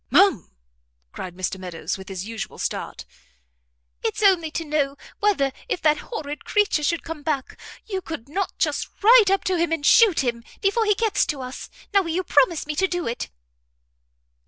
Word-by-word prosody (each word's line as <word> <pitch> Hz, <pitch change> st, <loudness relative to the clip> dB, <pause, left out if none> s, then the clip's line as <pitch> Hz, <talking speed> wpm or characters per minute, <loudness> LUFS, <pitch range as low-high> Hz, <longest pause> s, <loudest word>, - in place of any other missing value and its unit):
"Ma'am!" 390 Hz, -, +4 dB, 0.6 s
cried 180 Hz, -, -7 dB
Mr 185 Hz, +1 st, -3 dB
Meadows, 175 Hz, -2 st, -4 dB
with 190 Hz, 0 st, -10 dB
his 190 Hz, 0 st, -5 dB
usual 225 Hz, -1 st, -6 dB
start. -, -, -4 dB, 1.0 s
"It's -, -, -2 dB
only 365 Hz, -5 st, +4 dB
to 325 Hz, +1 st, -4 dB
know, 290 Hz, -2 st, 0 dB, 0.2 s
whether 375 Hz, -10 st, +2 dB, 0.2 s
if -, -, -1 dB
that 305 Hz, -1 st, +4 dB
horrid 300 Hz, -11 st, -5 dB
creature 415 Hz, -7 st, +2 dB
should 335 Hz, +3 st, 0 dB
come 325 Hz, -2 st, -6 dB
back, 285 Hz, -3 st, -2 dB, 0.3 s
you 385 Hz, -3 st, -3 dB
could 320 Hz, -8 st, -7 dB
not 375 Hz, +6 st, -3 dB
just -, -, 0 dB, 0.2 s
ride 450 Hz, -2 st, +7 dB
up 390 Hz, 0 st, +2 dB
to 370 Hz, -2 st, 0 dB
him 335 Hz, 0 st, +1 dB
and 320 Hz, -3 st, -1 dB
shoot 400 Hz, -, +6 dB
him, 235 Hz, -2 st, -2 dB, 0.2 s
before 435 Hz, +3 st, +2 dB
he 420 Hz, -1 st, +3 dB
gets 440 Hz, 0 st, +1 dB
to 290 Hz, -5 st, -3 dB
us? 255 Hz, +1 st, -7 dB, 0.2 s
Now 395 Hz, -, +6 dB
will 340 Hz, -, -5 dB
you 355 Hz, +3 st, 0 dB
promise 300 Hz, 0 st, +3 dB
me 300 Hz, 0 st, -4 dB
to 385 Hz, -, +3 dB
do 350 Hz, -2 st, -2 dB
it?" 235 Hz, -, -3 dB
320 Hz, 180 wpm, -23 LUFS, 265-390 Hz, 1.0 s, ride